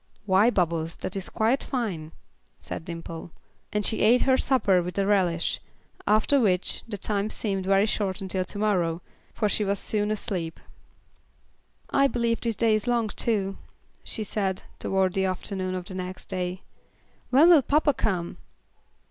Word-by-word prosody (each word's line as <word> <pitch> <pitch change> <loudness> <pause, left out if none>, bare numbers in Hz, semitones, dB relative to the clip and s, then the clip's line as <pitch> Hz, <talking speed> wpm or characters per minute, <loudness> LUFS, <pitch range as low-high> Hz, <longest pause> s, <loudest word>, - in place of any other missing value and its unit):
"Why, 200 +3 +5
Bubbles, 170 -6 0
that 185 - -5
is 195 -2 -4
quite 230 +5 +1
fine," 190 - -3 0.5
said 160 - -7
Dimple, 165 -1 -7 0.4
and 210 -1 0
she 220 - +1
ate 235 +4 +5
her 260 - +4
supper 215 -9 +3
with 180 +2 -6
a 195 - +2
relish; 185 -5 +1 0.5
after 215 +7 +4
which, 185 -6 +1
the 215 -3 -4
time 205 +1 -1
seemed 195 -4 -2
very 195 +1 +4
short 200 -3 -1
until 190 -1 -2
to 205 - -9
morrow, 180 -5 0 0.3
for 215 - +1
she 210 - 0
was 200 0 0
soon 210 +1 -1
asleep. 190 -6 -2 1.3
"I 275 0 +4
believe 235 -3 0
this 230 -2 0
day 225 0 +3
is 215 +3 0
long 235 -3 +1
too," 200 -3 -1 0.4
she 220 - -2
said, 195 -3 -2 0.2
toward 190 -1 +1
the 190 -1 +1
afternoon 185 0 -3
of 180 -1 -4
the 185 - -8
next 185 0 -6
day. 185 -1 -4 0.7
"When 290 +7 +6
will 330 -5 +8
papa 290 +2 +2
come?" 185 -7 -2
200 Hz, 160 wpm, -26 LUFS, 185-220 Hz, 1.3 s, will